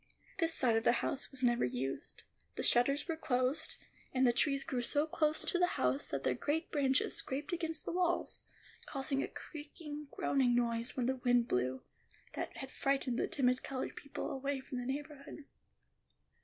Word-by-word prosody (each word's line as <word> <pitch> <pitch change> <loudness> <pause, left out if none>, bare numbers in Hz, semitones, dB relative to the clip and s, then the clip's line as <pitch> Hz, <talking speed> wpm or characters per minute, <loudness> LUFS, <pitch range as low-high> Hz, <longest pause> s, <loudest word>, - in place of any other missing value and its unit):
This 330 -2 +3
side 240 -4 +4
of 225 - 0
the 240 - +5
house 275 - -2
was 265 -1 -5
never 240 -1 +4
used; 125 +2 -3 0.3
the - - -2
shutters 275 +6 +4
were 330 - 0
closed; 265 0 0 0.4
and 260 0 +4
the 240 - +5
trees 275 +2 +2
grew 250 -2 -1
so 290 +5 +2
close 310 0 +1
to 355 - +1
the 355 - +5
house 130 +2 +1
that 140 -1 -3
their 130 - +2
great 300 - -1
branches 270 -3 +2
scraped 285 +6 -3
against 325 -2 -2
the - - -2
walls, 350 0 0 0.4
causing 275 0 0
a - - -1
creaking, 300 -1 -8
groaning 260 -4 +2
noise 235 0 +1
when 250 - +1
the 260 +1 +1
wind 245 -1 +3
blew, 125 +1 0 0.5
that - - -4
had 270 -1 -6
frightened 270 -3 0
the - - +1
timid 255 -2 +2
colored 260 -1 -4
people 280 - -5
away 275 +1 -2
from 260 -1 -5
the 245 - -4
neighborhood. 290 0 -7
270 Hz, 180 wpm, -35 LUFS, 245-295 Hz, 0.5 s, the